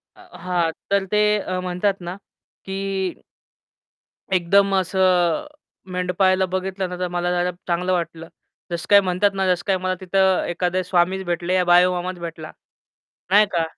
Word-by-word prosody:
अ, -, -, -17 dB, 0.2 s
हां, 175 Hz, -2 st, 0 dB, 0.2 s
तर 200 Hz, -1 st, +2 dB
ते 210 Hz, 0 st, +3 dB, 0.2 s
अ, 185 Hz, -2 st, -3 dB
म्हणतात 185 Hz, +2 st, -1 dB
ना 175 Hz, +1 st, -5 dB, 0.5 s
की 195 Hz, 0 st, -5 dB, 1.6 s
एकदम 195 Hz, +2 st, +3 dB
असं 185 Hz, -, +2 dB, 0.5 s
मेंढपाळाला 185 Hz, +1 st, +1 dB
बघितलं 185 Hz, 0 st, -3 dB
ना 180 Hz, -, -5 dB
तर 180 Hz, -, -1 dB
मला 175 Hz, 0 st, -2 dB
जरा 180 Hz, 0 st, 0 dB, 0.2 s
चांगलं 180 Hz, +1 st, 0 dB
वाटलं. 165 Hz, -2 st, -3 dB, 0.4 s
जसं 170 Hz, 0 st, -3 dB
काय 205 Hz, -, +8 dB
म्हणतात 190 Hz, +2 st, +1 dB
ना, 195 Hz, -1 st, -1 dB
जसं 180 Hz, -1 st, +1 dB
काय 195 Hz, -1 st, +2 dB
मला 185 Hz, 0 st, -2 dB
तिथं 190 Hz, 0 st, +2 dB
एखादे 180 Hz, +1 st, -1 dB
स्वामीच 180 Hz, +1 st, +1 dB
भेटले 175 Hz, +1 st, -2 dB
या 185 Hz, -, +3 dB
बाळूमामाच 180 Hz, +1 st, +3 dB
भेटला. 165 Hz, -2 st, -7 dB, 0.8 s
नाही 210 Hz, +2 st, +6 dB
का? 170 Hz, -2 st, +1 dB
180 Hz, 150 wpm, -22 LUFS, 175-190 Hz, 1.6 s, काय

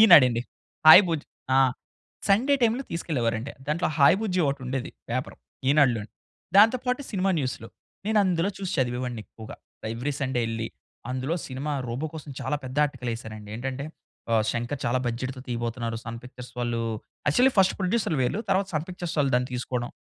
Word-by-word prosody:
ఈనాడండి 130 Hz, -, +8 dB, 0.4 s
hi 175 Hz, +5 st, +12 dB
బుజ్జి 160 Hz, -3 st, -2 dB, 0.3 s
ఆ! -, -, +6 dB, 0.7 s
Sunday 250 Hz, +9 st, +4 dB
టైమ్‌లో 235 Hz, +4 st, +2 dB
తీసుకెళ్ళేవారండి. 125 Hz, -7 st, -1 dB
దాంట్లో 155 Hz, +4 st, 0 dB
హాయ్ 140 Hz, +6 st, +7 dB
బుజ్జి 185 Hz, -5 st, 0 dB
ఒకటుండేది 130 Hz, -2 st, -3 dB, 0.2 s
పేపరు -, -, -3 dB, 0.3 s
ఈనాడులోని. 125 Hz, -7 st, +3 dB, 0.5 s
దాంతో 225 Hz, +5 st, +7 dB
పాటు 250 Hz, +2 st, +1 dB
సినిమా 195 Hz, 0 st, +1 dB
న్యూస్‌లు 130 Hz, -4 st, -3 dB, 0.4 s
నేనందులో 195 Hz, -4 st, +2 dB
చూసి 190 Hz, -2 st, -3 dB
చదివేవాడిని 125 Hz, -2 st, -1 dB
ఎక్కువగా. 110 Hz, -1 st, -11 dB, 0.4 s
ఎవ్రీ 130 Hz, +5 st, -2 dB
సండే 130 Hz, -3 st, 0 dB
యెళ్లి 115 Hz, 0 st, -3 dB, 0.4 s
అందులో 130 Hz, +5 st, -1 dB
సినిమా 140 Hz, +3 st, -4 dB
'రోబో' 130 Hz, +7 st, -3 dB
కోసం 150 Hz, -2 st, -8 dB
చాలా 130 Hz, +3 st, -1 dB
పెద్ద 130 Hz, +2 st, -7 dB
ఆర్టికల్ 125 Hz, -4 st, -4 dB
ఎసారండి 110 Hz, -2 st, -9 dB
ఏంటంటే 135 Hz, +3 st, -4 dB, 0.5 s
ఆహ్, 110 Hz, -1 st, +4 dB
'శంకర్' 120 Hz, +4 st, -3 dB
చాలా 120 Hz, +2 st, +2 dB
బడ్జెట్‌తో 130 Hz, +2 st, -3 dB
తీయబోతున్నారు 115 Hz, -1 st, -2 dB
'సన్ 115 Hz, 0 st, -5 dB
పిక్చర్స్' 125 Hz, 0 st, -10 dB
వాళ్ళు 120 Hz, -1 st, -1 dB, 0.5 s
యాక్చువల్లి 250 Hz, -, +4 dB
ఫస్ట్ 190 Hz, -, +5 dB
ప్రొడ్యూసర్‌లు 185 Hz, -, +1 dB
వీళ్ళు 160 Hz, -, 0 dB
తరువాత 195 Hz, 0 st, +2 dB
'సన్ 155 Hz, +2 st, -1 dB
పిక్చర్స్' 175 Hz, -2 st, -5 dB
వాళ్ళు 135 Hz, -2 st, +1 dB
దాన్ని 125 Hz, +1 st, -1 dB
తీసుకోవడం. 125 Hz, -1 st, -3 dB
135 Hz, 155 wpm, -26 LUFS, 120-175 Hz, 0.7 s, హాయ్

